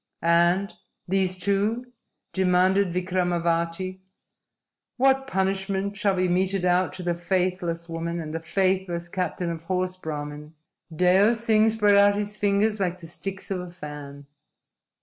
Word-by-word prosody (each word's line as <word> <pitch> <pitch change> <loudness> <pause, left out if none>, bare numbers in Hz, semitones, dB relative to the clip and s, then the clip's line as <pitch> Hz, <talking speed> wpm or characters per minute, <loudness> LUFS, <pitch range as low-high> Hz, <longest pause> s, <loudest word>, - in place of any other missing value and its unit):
"And 175 +4 +3 0.3
these 185 0 +1
two?" 205 +6 -1 0.4
demanded 190 +1 +3
Vikramavati. 180 0 -1 1.0
"What 270 +1 +3
punishment 195 -1 -1
shall 200 -1 +1
be 185 0 +1
meted 185 +1 +1
out 180 +1 +2
to 185 -1 -6
the 175 0 0
faithless 175 -1 -1
woman 170 +1 -4
and 155 -1 -6
the 165 - -2
faithless 180 0 -1
captain 180 -1 -2
of 165 0 -7
horse, 185 0 -1
Brahmin?" 150 -2 -7 0.4
Deo 185 +7 +4
Singh 225 -1 +3
spread 210 -2 +3
out 200 0 +5
his 205 0 -3
fingers 210 +1 +1
like 185 -2 -1
the 170 - -11
sticks 190 +4 -6
of 190 - -1
a 180 0 -7
fan. 145 -4 -9
185 Hz, 135 wpm, -25 LUFS, 170-200 Hz, 1.0 s, out